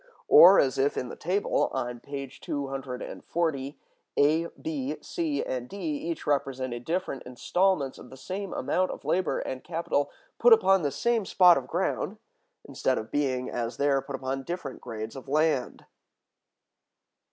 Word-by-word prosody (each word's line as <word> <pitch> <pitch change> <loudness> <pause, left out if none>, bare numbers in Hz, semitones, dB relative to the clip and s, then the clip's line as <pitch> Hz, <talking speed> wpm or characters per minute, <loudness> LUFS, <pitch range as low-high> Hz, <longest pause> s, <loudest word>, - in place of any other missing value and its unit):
Or, 185 +3 +9
as 135 -1 +2
if 140 +2 +1
in 125 - -2
the - - -7
table 190 +5 0
on 120 -2 -3
page 140 0 -7
240, 135 +2 -3 0.4
A, 155 +4 +4
B, 290 -4 -3
C, 325 -5 -2
and 125 -1 -4
D 200 - -8
each 165 -2 -3
represented 130 -4 -1
different 170 -6 -2
installments 145 +3 0
of 125 - -12
the 130 - -12
same 190 +8 -5
amount 180 +8 0
of - - -7
labor 185 +1 +1
and 130 -1 -4
capital 165 -4 -1 0.3
put 240 0 +8
upon 195 -4 +5
the 145 - 0
same 225 - 0
spot 180 -2 +6
of 130 -4 -3
ground, 190 +4 -1 0.5
instead 130 -1 0
of 110 - -5
being, 130 -3 0
as 115 0 -3
there, 140 -1 +2
put 135 +1 -6
upon 135 0 -3
different 155 -3 -6
grades 110 0 -6
of 135 0 -9
land. 150 -2 0
145 Hz, 150 wpm, -27 LUFS, 130-180 Hz, 0.5 s, Or